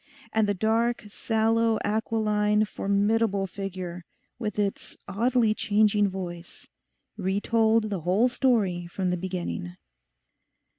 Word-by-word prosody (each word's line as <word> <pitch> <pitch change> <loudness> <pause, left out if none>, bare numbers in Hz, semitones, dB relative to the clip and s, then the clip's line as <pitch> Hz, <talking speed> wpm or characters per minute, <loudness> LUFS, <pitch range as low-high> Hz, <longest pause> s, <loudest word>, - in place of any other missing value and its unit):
And 220 -1 +2
the 205 - 0
dark, 225 +5 +1
sallow, 225 +1 +1
aquiline, 210 -1 +1
formidable 200 0 +1
figure, 180 -2 -6 0.4
with 215 -4 -3
its 200 -1 -3
oddly 230 +2 +2
changing 210 -1 +2
voice, 175 -2 -8 0.5
re 190 -1 0
told 225 0 +2
the 190 -4 -2
whole 190 +9 +3
story 215 -9 +1
from 180 +1 -2
the - - +1
beginning. 170 - -4
210 Hz, 110 wpm, -26 LUFS, 190-225 Hz, 0.5 s, whole